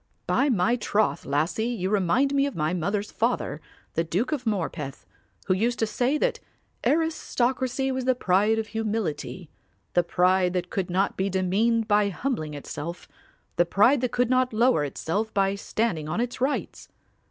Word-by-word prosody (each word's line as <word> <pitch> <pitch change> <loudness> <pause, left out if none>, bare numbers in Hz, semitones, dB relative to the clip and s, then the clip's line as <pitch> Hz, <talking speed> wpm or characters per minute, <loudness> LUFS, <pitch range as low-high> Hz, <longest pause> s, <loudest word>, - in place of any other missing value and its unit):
By 285 - +2
my 235 +1 +2
troth, 215 -1 0
lassie, 155 +11 0
you 200 -6 -2
remind 210 +8 +2
me 280 0 +3
of 280 - -6
my 155 +2 0
mother's 200 +4 -2
father, 230 -9 -1 0.3
the 165 - +1
Duke 185 - -1
of 265 -6 -2
Morpeth, 165 -9 -3 0.4
who 185 - +2
used 230 +5 0
to 225 - +1
say 250 +6 0
that - - 0 0.4
aristocracy 265 -4 0
was 260 -1 -2
the 255 0 +3
pride 210 +1 +2
of 220 -1 -2
humility, 205 -7 -3 0.4
the 175 - +5
pride 180 +1 +2
that 180 -1 -2
could 190 -2 -2
not 190 +3 0
be 190 +1 0
demeaned 210 +5 +1
by 205 -1 +3
humbling 185 - -3
itself, 150 +4 -6 0.5
the 175 - +4
pride 235 +9 +4
that 250 - 0
could 245 0 +1
not 255 -1 +2
lower 235 -7 +3
itself 195 +9 -2
by 195 -1 +2
standing 200 -6 -2
on 175 - -1
its 245 +1 -3
rights. 275 +3 -2
210 Hz, 165 wpm, -26 LUFS, 180-245 Hz, 0.5 s, the